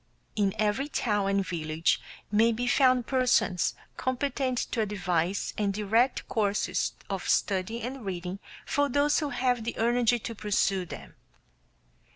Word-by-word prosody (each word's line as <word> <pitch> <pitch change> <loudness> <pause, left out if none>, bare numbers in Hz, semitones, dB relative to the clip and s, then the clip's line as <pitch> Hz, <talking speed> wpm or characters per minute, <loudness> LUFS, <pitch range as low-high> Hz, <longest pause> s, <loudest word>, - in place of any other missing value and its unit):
In 200 -2 +1
every 215 +6 +1
town 205 -8 0
and 195 -1 +1
village 160 -2 0 0.3
may 225 +2 +4
be 235 +2 -2
found 255 -1 +4
persons 230 -9 +2 0.2
competent 260 0 -1
to 230 - 0
advise 185 -3 -1
and 205 -2 +1
direct 225 +5 +1
courses 200 -4 0
of 195 -2 -4
study 200 +4 +1
and 255 +1 -5
reading 185 0 -4 0.3
for 285 0 +1
those 285 +3 +3
who 300 - -2
have 250 -4 0
the 235 - -4
energy 240 +1 +3
to 230 0 -6
pursue 195 -3 0
them. - - -9
220 Hz, 140 wpm, -28 LUFS, 195-250 Hz, 0.3 s, may